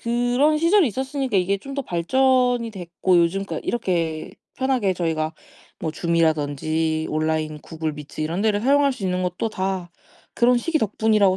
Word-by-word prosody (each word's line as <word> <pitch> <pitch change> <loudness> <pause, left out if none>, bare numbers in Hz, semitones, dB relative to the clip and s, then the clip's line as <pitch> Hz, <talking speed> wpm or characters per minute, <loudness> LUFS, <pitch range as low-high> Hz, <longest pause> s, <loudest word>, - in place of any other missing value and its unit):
그런 245 +6 +2
시절이 335 +3 +4
있었으니까 265 -1 -2
이게 190 +2 +1
좀 275 +7 -8
더 280 - -2
발전이 245 +5 +2
됐고 180 -1 0
요즘 170 +4 +1
그러니까 - - -5
이렇게 170 -8 -1 0.2
편하게 255 -7 +1
저희가 160 -2 -1 0.5
뭐 160 - -2
Zoom이라든지 160 -1 0
온라인 155 0 -1
Google 160 -1 -4
Meet 150 +1 -7
이런 170 +6 -2
데를 210 -2 +2
사용할 280 +2 +3
수 255 - -10
있는 180 0 0
것도 180 +5 -2
다 190 -3 -3 0.4
그런 245 +1 +4
시기 315 +5 0
덕분이라고 210 -3 +2
190 Hz, 410 characters per minute, -23 LUFS, 165-245 Hz, 0.5 s, 시절이